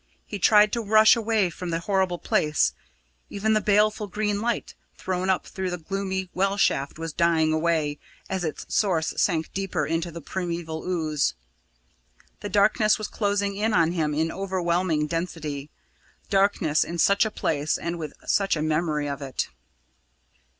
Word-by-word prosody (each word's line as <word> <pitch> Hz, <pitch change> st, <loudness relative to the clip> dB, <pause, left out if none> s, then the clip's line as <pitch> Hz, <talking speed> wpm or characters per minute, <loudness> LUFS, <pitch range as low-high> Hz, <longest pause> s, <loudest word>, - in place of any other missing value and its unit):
He 205 Hz, -, -6 dB
tried 210 Hz, +2 st, +5 dB
to 235 Hz, -, 0 dB
rush 215 Hz, +2 st, +6 dB
away 220 Hz, -5 st, +1 dB
from 180 Hz, +1 st, -6 dB
the 165 Hz, 0 st, -1 dB
horrible 190 Hz, -2 st, 0 dB
place; 150 Hz, -3 st, +1 dB, 0.6 s
even 215 Hz, +2 st, 0 dB
the 215 Hz, -, +2 dB
baleful 210 Hz, +1 st, +2 dB
green 210 Hz, +1 st, -1 dB
light, 235 Hz, 0 st, -2 dB, 0.2 s
thrown 185 Hz, 0 st, -2 dB
up 190 Hz, -, +1 dB
through 190 Hz, -1 st, -4 dB
the 180 Hz, -, -3 dB
gloomy 190 Hz, +2 st, -3 dB
well 195 Hz, +2 st, 0 dB
shaft, 140 Hz, -8 st, +1 dB
was 165 Hz, -1 st, -5 dB
dying 160 Hz, -2 st, +2 dB
away 155 Hz, -2 st, 0 dB, 0.3 s
as 190 Hz, -1 st, -2 dB
its 155 Hz, -3 st, -4 dB
source 175 Hz, -7 st, +1 dB
sank 165 Hz, -4 st, 0 dB
deeper 190 Hz, -6 st, -1 dB
into 165 Hz, +3 st, -1 dB
the 170 Hz, 0 st, -8 dB
primeval 170 Hz, -1 st, -4 dB
ooze. 155 Hz, -, 0 dB, 1.0 s
The 205 Hz, -, -5 dB
darkness 210 Hz, +2 st, +3 dB
was 215 Hz, -2 st, -4 dB
closing 200 Hz, -1 st, -1 dB
in 215 Hz, +2 st, 0 dB
on 165 Hz, -1 st, +3 dB
him 155 Hz, -4 st, -1 dB
in 160 Hz, +2 st, 0 dB
overwhelming 180 Hz, -4 st, 0 dB
density 155 Hz, -3 st, -4 dB, 0.6 s
darkness 195 Hz, -6 st, +3 dB
in 170 Hz, -, -5 dB
such 200 Hz, +4 st, +4 dB
a 220 Hz, -, 0 dB
place 155 Hz, -7 st, -1 dB
and 170 Hz, 0 st, -4 dB
with 155 Hz, -3 st, -5 dB
such 195 Hz, -3 st, +2 dB
a 150 Hz, -, -2 dB
memory 155 Hz, -1 st, 0 dB
of 140 Hz, 0 st, -4 dB
it! 135 Hz, -2 st, -3 dB
180 Hz, 160 wpm, -25 LUFS, 160-200 Hz, 1.0 s, rush